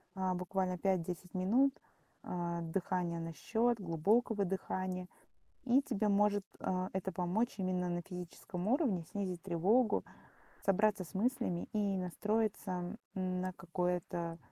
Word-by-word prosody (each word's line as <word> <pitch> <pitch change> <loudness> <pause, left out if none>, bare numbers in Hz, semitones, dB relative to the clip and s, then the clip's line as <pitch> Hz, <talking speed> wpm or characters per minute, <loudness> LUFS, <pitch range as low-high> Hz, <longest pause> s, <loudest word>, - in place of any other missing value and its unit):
А, 190 -1 +1
буквально 185 0 -1
5-10 180 -1 -1
минут, 235 +9 +3 0.4
а, 170 -1 -2
дыхания 170 0 -1
на 165 0 -4
счёт, 230 +6 +1
глубокого 200 +5 +2
дыхания. 185 -1 -2 0.6
И 260 +1 +5
тебе 220 -6 0
может, 205 0 +3
а, 185 0 -1
это 190 0 -2
помочь 185 +7 0
именно 185 -1 0
на 175 0 -1
физическом 180 0 -6
уровне, 230 - +2
снизить 185 -4 -2
тревогу, 200 +6 +3 0.6
собраться 200 0 +3
с 165 - -13
мыслями 220 -4 0
и 200 -3 +1
настроиться 195 0 -1 0.2
на 185 0 -1
какое-то, 175 -1 -2
185 Hz, 120 wpm, -35 LUFS, 180-210 Hz, 0.6 s, И